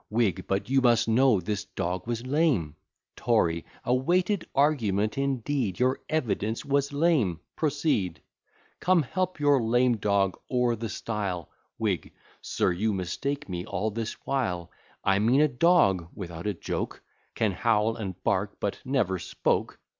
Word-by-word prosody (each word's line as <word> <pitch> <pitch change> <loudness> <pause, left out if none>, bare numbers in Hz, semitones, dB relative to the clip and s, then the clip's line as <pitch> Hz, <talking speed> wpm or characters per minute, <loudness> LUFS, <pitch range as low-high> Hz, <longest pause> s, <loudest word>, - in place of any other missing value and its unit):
WHIG. 105 -5 0
But 95 0 -1
you 135 +1 +3
must 120 -2 +4
know 115 -1 +4
this 100 +3 -3
dog 90 0 -4
was 120 0 -3
lame. 130 - +1 0.4
TORY. 85 -8 +1 0.2
A 125 - +1
weighty 175 +9 +2 0.2
argument 110 -8 +2
indeed! 135 -5 -1
Your 130 +1 +2
evidence 115 -7 -1
was 140 0 +1
lame: 140 - +2 0.2
proceed: 145 - 0 0.6
Come, 180 -3 +3
help 185 +5 -2
your 145 -3 +4
lame 120 +1 +3
dog 100 -2 +1
o'er 125 -2 +2
the 115 0 -5
stile. 95 -6 -3 0.3
WHIG. 105 -6 -1 0.3
Sir, - - 0
you 105 +5 0
mistake 140 - -3
me 90 -2 -4
all 100 +3 -2
this 115 +1 -3
while: 95 -11 -1 0.3
I 95 0 +3
mean 120 +6 +3
a 155 - +5
dog 125 - +3
(without 85 -1 -6
a 105 - -1
joke) - - -4 0.3
Can 110 -2 +1
howl, 110 +2 +1
and 95 -5 -5
bark, - - 0
but - - -2
never 110 -9 0
spoke. - - -1
115 Hz, 145 wpm, -27 LUFS, 95-135 Hz, 0.6 s, a